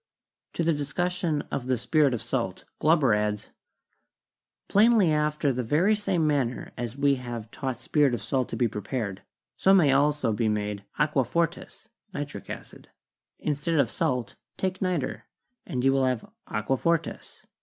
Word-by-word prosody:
To 170 - -1
the 165 0 +3
discussion 160 +2 -1
of 125 - -3
the 130 -1 +2
'spirit 145 +1 +2
of 110 - -5
s~lt,' - - -3
Glauber 155 -7 +4
adds: 105 0 -1 1.2
"Plainly 210 -4 +5
after 150 -2 +1
the 125 - -1
very 155 - +3
same 195 -6 +1
manner 135 -5 0
as 120 +1 -5
we 140 -1 +3
have 120 -3 -6
taught 130 -3 -4
spirit 145 -6 +3
of - - -6
salt 130 -2 -1
to - - -4
be 120 +1 +2
prepared, 105 -2 -4 0.4
so 195 +1 +5
may 155 -7 +5
also 145 -3 +2
be 110 +1 +1
made 105 -1 -2
'Aqua 150 -2 +2
fortis' 170 - -2 0.3
(nitric 145 0 -5
acid).... - - -9 0.5
In 150 - -1
stead 150 +4 -2
of 135 -6 +3
salt 125 -5 -1 0.2
take 185 0 -2
niter, 145 - -1 0.4
and 125 -1 -2
you 135 - +5
will 135 -1 +2
have 125 -3 -1 0.2
'Aqua 110 +5 -1
fortis.' 165 +1 -2
140 Hz, 160 wpm, -27 LUFS, 120-160 Hz, 1.2 s, Plainly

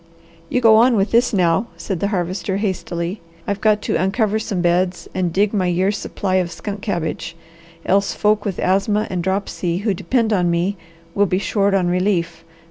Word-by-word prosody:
"You 250 - 0
go 220 -2 +7
on 240 +2 +5
with 200 0 +1
this 235 +2 +3
now," 180 +1 +2
said 195 -5 -4
the 200 - 0
Harvester 185 -1 -2
hastily. 185 -2 -3 0.2
"I've 200 0 -3
got 215 -1 +2
to - - 0
uncover 215 +2 +1
some 210 -4 -3
beds 175 +1 0
and 180 -2 -1
dig 200 +4 +1
my 190 -4 +1
year's 185 +3 +1
supply 190 -2 -2
of 180 -2 0
skunk 200 +3 -6
cabbage, 170 -4 -3 0.5
else 195 +1 +2
folk 210 0 +2
with 195 -4 -3
asthma 200 +3 +1
and 180 -2 -1
dropsy 190 -2 -2
who 210 - +2
depend 225 +3 0
on 180 -3 +2
me 175 +4 0 0.4
will 205 0 +2
be 185 - 0
short 200 +1 +1
on 185 -2 +2
relief. 175 -2 0
195 Hz, 185 wpm, -20 LUFS, 180-210 Hz, 0.5 s, go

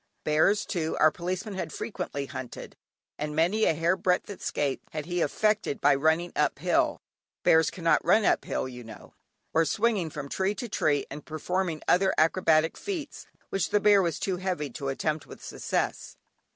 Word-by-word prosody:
Bears, 160 +8 +3
too, 165 -5 -2
our 155 0 +6
Policeman 185 +5 -4
had 190 - -4
frequently 175 -9 -4
hunted, 130 -2 -8 0.4
and 150 0 -3
many 180 +8 +2
a 160 - +2
hair 165 +3 +2
breadth 185 +1 0
escape 145 -7 -2
had 155 -2 -5
he 175 0 -2
effected 210 +2 +1
by 145 0 +5
running 160 +5 +1
up - - +1
hill - - +1 0.4
(bears 160 -1 +5
cannot 165 -4 +1
run 200 +5 +4
up - - +3
hill, - - -2
you 125 -1 -9
know), 110 -2 -12 0.4
or 165 - +4
swinging 205 -1 +1
from 145 -2 -6
tree 190 +7 -1
to 245 - -5
tree 150 -8 +1
and 150 +2 -8
performing 170 +1 -2
other 190 +1 +3
acrobatic 160 -1 +3
feats 335 -8 -6 0.2
which 195 - -1
the 210 - +3
bear 205 -1 +5
was 170 -4 -1
too 185 0 -2
heavy 180 -7 -3
to 140 +2 -5
attempt 155 +3 -2
with - - -11
success. - - -3
170 Hz, 175 wpm, -27 LUFS, 150-190 Hz, 0.4 s, our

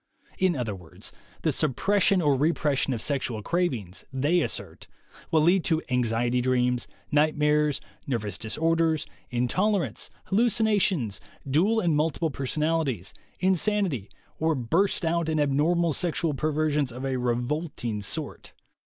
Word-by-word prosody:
In 185 -3 +3
other 120 -6 -2
words, 85 -4 -10 0.3
the - - +3
suppression 190 +6 +2
or 145 -2 +4
repression 145 -1 +1
of 115 -4 -2
sexual 125 -6 -2
cravings, 125 - -2
they 145 +7 +2
assert, - - -5 0.4
will 155 -2 +3
lead 175 +2 +4
to 160 -2 +2
anxiety 120 0 +1
dreams, 125 -1 +1 0.2
nightmares, 150 -1 +2 0.3
nervous 105 -7 -2
disorders, 160 +6 +1 0.2
intolerance, 140 - 0 0.2
hallucin 225 +2 +3
ations, 180 - +1 0.3
dual 185 +12 +3
and 170 -6 +2
multiple 160 +1 0
personalities, 140 - -1 0.3
insanity, 185 - +1 0.3
or 160 0 +2
burst 165 +10 +1
out 165 0 +1
in 155 -1 +1
abnormal 155 +4 +2
sexual 165 -1 0
perversions 150 -2 0
of 125 +3 -6
a 135 -1 -1
revolting 125 -1 -2
sort. 100 - -5
150 Hz, 125 wpm, -26 LUFS, 125-170 Hz, 0.4 s, or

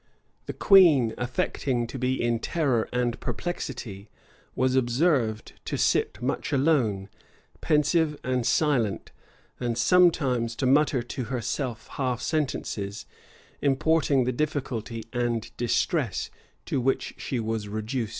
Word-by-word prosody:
The - - -3
queen, 160 - +6
affecting 120 0 -1
to 125 +3 -7
be 130 +1 0
in 120 -1 +1
terror 130 -6 0
and 125 -1 -1
perplexity, 120 - -5 0.5
was 130 0 +1
observed 120 -3 +1
to - - -2
sit - - +1
much - - -2
alone, 130 -9 +1 0.5
pensive 150 0 +2
and 125 -1 0
silent; 125 -6 +1 0.5
and 120 -2 -2
sometimes 130 -6 +3
to 130 - -2
mutter 135 -1 +3
to 125 +1 -5
herself 125 -1 -3
half 125 -3 -2
sentences, 120 -9 -3 0.6
importing 145 -1 +2
the 125 - 0
difficulty 125 -5 -3
and 120 -2 -2
distress 120 -1 0 0.3
to 130 - -1
which 135 +2 0
she 130 - -3
was 110 -2 -3
reduced. 110 +2 -3
125 Hz, 120 wpm, -26 LUFS, 115-145 Hz, 0.6 s, queen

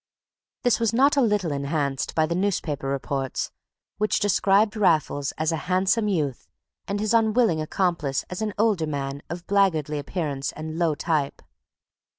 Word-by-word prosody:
This 245 - +3
was 230 -1 +1
not 275 +5 +4
a 280 - +4
little 210 - +1
enhanced 140 0 -2
by 160 - +3
the 170 - -2
newspaper 170 -7 -1
reports, 135 -1 -2 0.5
which 215 0 +1
described 205 +1 +3
Raffles 155 -8 +2
as 155 +1 0
a - - 0
handsome 190 +4 +2
youth, 150 - -1 0.4
and 200 +1 -2
his 215 +1 0
unwilling 220 -6 +3
accomplice 155 -4 -1
as 180 +3 -6
an 215 -2 -2
older 205 -7 +2
man 140 -1 -3
of 175 +1 -6
blackguardly 160 -7 +1
appearance 145 -2 -3
and 155 +2 -6
low 165 -3 +2
type. 150 -2 -1
170 Hz, 155 wpm, -25 LUFS, 145-205 Hz, 0.5 s, not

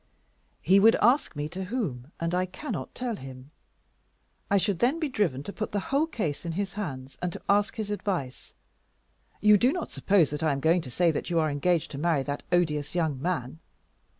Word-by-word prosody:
"He 190 +4 +5
would 225 +3 +6
ask 245 - +3
me 145 0 -2
to 185 +3 -5
whom, 165 - -3
and 170 +1 -1
I 185 +1 +1
cannot 285 - -6
tell 245 -3 -2
him. 130 +1 -10 1.0
I 200 - +4
should 195 -2 0
then 270 +7 +2
be 315 - 0
driven 190 - 0
to 200 - -7
put 215 - -4
the 205 - +1
whole 295 +3 +3
case 170 - -3
in 170 -1 -3
his 195 +2 -3
hands, 135 -10 -6
and 180 - -1
to - - -7
ask 205 +3 +2
his 215 -3 -4
advice. 180 -11 -4 0.9
You 210 -1 +6
do 250 +5 +4
not 350 +1 -4
suppose 185 -8 +3
that 150 - -4
I 155 -2 +2
am 135 - -2
going 165 +5 +3
to 140 - -8
say 170 +6 +2
that 155 - -4
you 170 - 0
are 155 -2 +2
engaged 165 +3 0
to 140 - -6
marry 160 -3 +1
that 145 +1 -4
odious 150 -4 +1
young 155 -6 0
man? 160 -4 -2
175 Hz, 205 wpm, -27 LUFS, 145-205 Hz, 1.0 s, would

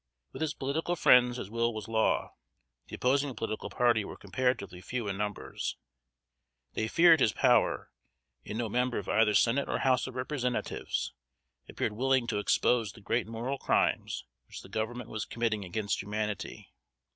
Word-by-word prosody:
With - - -9
his 160 -1 -1
political 155 +6 -1
friends 125 -5 +5
his 100 - -6
will 115 0 0
was 110 -2 -5
law. 110 -1 +1 0.5
The - - -7
opposing 135 +1 +1
political 110 0 -4
party 120 -3 +2
were - - -8
comparatively 100 -5 -2
few 120 +2 -4
in 100 - -2
numbers. 105 +1 -4 1.0
They 110 - -1
feared 165 +5 +6
his 110 - +3
power; - - +2 0.5
and 105 - -5
no 120 -1 -1
member 125 +3 0
of 100 - -4
either 110 -1 +3
Senate 125 +7 +3
or - - 0
House 130 -1 +2
of 130 - -8
Representatives 125 -1 -2 0.6
appeared - - -2
willing 130 +2 +2
to 105 - -1
expose 110 +1 +2
the - - -14
great 110 +3 0
moral 120 +5 -3
crimes - - 0 0.2
which - - -9
the - - -13
Government 110 +3 -4
was 110 - -3
committing 115 -3 -1
against 100 +3 -2
humanity. 105 0 -4
115 Hz, 160 wpm, -30 LUFS, 105-125 Hz, 1.0 s, feared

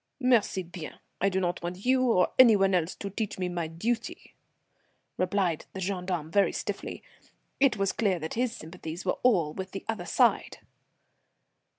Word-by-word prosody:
"Merci 235 -7 +2
bien! 170 -2 -8 0.3
I 195 - +4
do 190 0 0
not 175 -1 -1
want 180 +4 -6
you 260 0 +4
or 180 -4 +3
any 235 -4 +9
one 195 -1 +3
else 175 -1 0
to 200 - -6
teach 215 +1 -3
me 185 -1 -1
my 175 -2 -2
duty," 220 +9 -3 0.8
replied 185 -3 0
the 190 - -6
gendarme, 180 -4 -3
very 200 +2 +3
stiffly. - - -5 0.6
It 270 -5 +4
was 195 -1 +1
clear 200 -5 +1
that 160 -1 -5
his 245 0 0
sympathies 165 -3 -8
were - - 0
all 175 -12 +3
with 190 +2 -6
the 195 - -6
other 210 -6 -3
side. 245 -2 +2
190 Hz, 170 wpm, -28 LUFS, 175-215 Hz, 0.8 s, any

